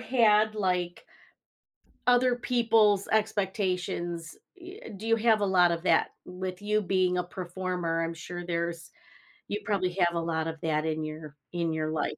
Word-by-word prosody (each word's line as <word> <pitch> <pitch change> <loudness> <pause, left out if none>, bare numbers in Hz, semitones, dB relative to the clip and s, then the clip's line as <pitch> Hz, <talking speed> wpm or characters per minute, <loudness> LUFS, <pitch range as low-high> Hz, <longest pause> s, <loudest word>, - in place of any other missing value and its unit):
had, 215 -4 +3
like 180 -3 -1 1.0
other 245 0 +4
people's 225 -5 +3
expectations? 185 -5 -1 0.2
Y 365 +4 -10 0.2
Do 220 +3 -8
you 225 0 +4
have 225 -1 +3
a 205 - +2
lot 180 -2 +4
of 170 0 -3
that? - - +3
With 185 +1 -6
you 210 +1 +1
being 185 -1 +1
a 180 - 0
performer, 180 -2 -3
I'm 165 0 -2
sure 175 +2 -7
there's 170 -1 -3 0.6
you 205 - -3
probably 190 -4 0
have 175 -1 +3
a - - +1
lot 160 -1 -1
of 160 -1 -5
that 155 -1 0
in 155 0 -1
your 155 -1 -7 0.2
in 170 -2 -1
your 155 0 -2
life. 155 - -2
180 Hz, 165 wpm, -28 LUFS, 170-210 Hz, 1.0 s, other